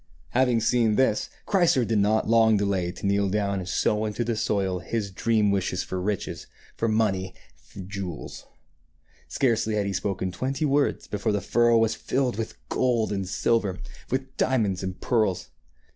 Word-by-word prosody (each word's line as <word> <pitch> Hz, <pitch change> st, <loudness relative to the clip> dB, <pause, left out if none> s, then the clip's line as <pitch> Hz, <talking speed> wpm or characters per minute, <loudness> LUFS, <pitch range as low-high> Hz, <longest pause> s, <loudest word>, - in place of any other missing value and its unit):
Having 125 Hz, -2 st, +2 dB
seen 115 Hz, -2 st, +2 dB
this, 130 Hz, -4 st, +1 dB, 0.2 s
Chrysor 175 Hz, -, +3 dB
did 110 Hz, -1 st, +1 dB
not 105 Hz, +2 st, +2 dB
long 110 Hz, -1 st, +5 dB
delay 95 Hz, -3 st, 0 dB
to 90 Hz, -, -8 dB
kneel 100 Hz, 0 st, +2 dB
down 100 Hz, -1 st, 0 dB
and 90 Hz, -1 st, -6 dB
sow 105 Hz, +3 st, +1 dB
into 110 Hz, +2 st, -2 dB
the 115 Hz, -1 st, -1 dB
soil 95 Hz, -4 st, 0 dB
his 100 Hz, +2 st, -3 dB
dream 105 Hz, +1 st, +2 dB
wishes 95 Hz, -2 st, -1 dB
for 95 Hz, -1 st, -4 dB
riches, 100 Hz, +1 st, -3 dB, 0.3 s
for 115 Hz, -, -1 dB
money 100 Hz, -4 st, 0 dB, 0.4 s
and 95 Hz, -2 st, -7 dB
jewels. 95 Hz, -5 st, -6 dB, 0.8 s
Scarcely 115 Hz, -4 st, +1 dB
had 105 Hz, -1 st, 0 dB
he 100 Hz, -, -2 dB
spoken 95 Hz, -1 st, -2 dB
twenty 135 Hz, -, -2 dB
words 145 Hz, 0 st, +1 dB
before 105 Hz, +2 st, -2 dB
the 105 Hz, -, +1 dB
furrow 120 Hz, +2 st, +3 dB
was 115 Hz, -1 st, +3 dB
filled 130 Hz, -4 st, -1 dB
with 110 Hz, -, -4 dB
gold 120 Hz, -, +1 dB
and 95 Hz, -2 st, -3 dB
silver, 105 Hz, -3 st, +1 dB, 0.3 s
with 130 Hz, +1 st, -3 dB
diamonds 105 Hz, -8 st, +1 dB
and 95 Hz, -1 st, -5 dB
pearls. 110 Hz, -7 st, 0 dB
105 Hz, 165 wpm, -26 LUFS, 95-115 Hz, 0.8 s, long